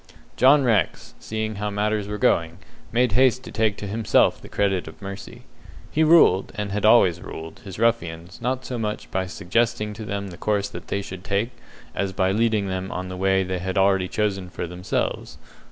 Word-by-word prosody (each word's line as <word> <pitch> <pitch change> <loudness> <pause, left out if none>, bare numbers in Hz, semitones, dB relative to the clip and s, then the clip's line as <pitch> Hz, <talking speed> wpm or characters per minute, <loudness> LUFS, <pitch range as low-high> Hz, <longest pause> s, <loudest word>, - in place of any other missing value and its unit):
John 135 +2 +6
Rex, 115 -6 0
seeing 110 -1 -4
how 105 +1 -2
matters 105 0 -1
were 105 0 -4
going, 85 -4 +1 0.3
made 120 0 +2
haste 130 +3 +3
to - - -9
take 110 -3 +1
to - - -6
himself 110 +2 +2
the - - -12
credit 95 -4 0
of 80 - -11
mercy. 100 0 -8 0.5
He 160 - +2
ruled, 155 - +5
and 105 -2 -3
had 105 +1 -1
always 95 -6 +5
ruled, 80 -1 -8
his 100 -6 -9
ruffians 90 -7 -1
not 130 +1 -2
so 125 -1 -4
much 105 -1 -4
by 95 0 -1
suggesting 105 +3 -1
to 110 +1 -8
them 100 -1 -4
the 85 - -10
course 100 0 0
they 100 - -4
should 95 -2 -8
take, 100 +5 -1 0.4
as 100 -1 -2
by 95 -1 +1
leading 110 -1 +1
them 95 0 -3
on 90 +1 -4
the 95 - -5
way 95 +1 +2
they 95 0 -3
had 95 +2 -3
already 95 -1 +3
chosen 95 -3 -1
for 90 - -5
themselves. 90 +2 -3
100 Hz, 190 wpm, -24 LUFS, 95-110 Hz, 0.5 s, John